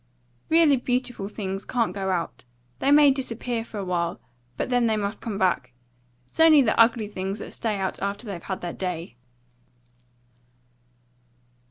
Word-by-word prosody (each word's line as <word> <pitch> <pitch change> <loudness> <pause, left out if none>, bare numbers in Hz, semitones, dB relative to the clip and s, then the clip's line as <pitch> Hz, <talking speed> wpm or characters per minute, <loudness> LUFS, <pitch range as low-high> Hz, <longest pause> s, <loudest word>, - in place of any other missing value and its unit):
"Really 320 -4 +5
beautiful 245 -4 -2
things 195 -2 -4
can't 230 -7 0
go 195 -1 -3
out. 175 -3 -2 0.4
They 270 - +1
may 290 -1 +7
disappear 245 -3 -3
for 225 - -9
a - - -2
little 185 -2 -5
while, 170 -1 -1 0.4
but - - -2
they 245 - +4 0.2
must 205 0 -3
come 215 -4 -4
back. 175 -10 0 0.5
It's 125 - -11
only 315 -3 +7
the 220 - +2
ugly 230 -1 +4
things 195 0 -4
that - - -8
stay 215 -3 -2
out 190 -1 -3
after 200 +4 -3
they've 195 -5 -6
had 190 +1 -5
their 175 -1 -4
day." 175 -6 -4
205 Hz, 160 wpm, -25 LUFS, 190-245 Hz, 0.5 s, may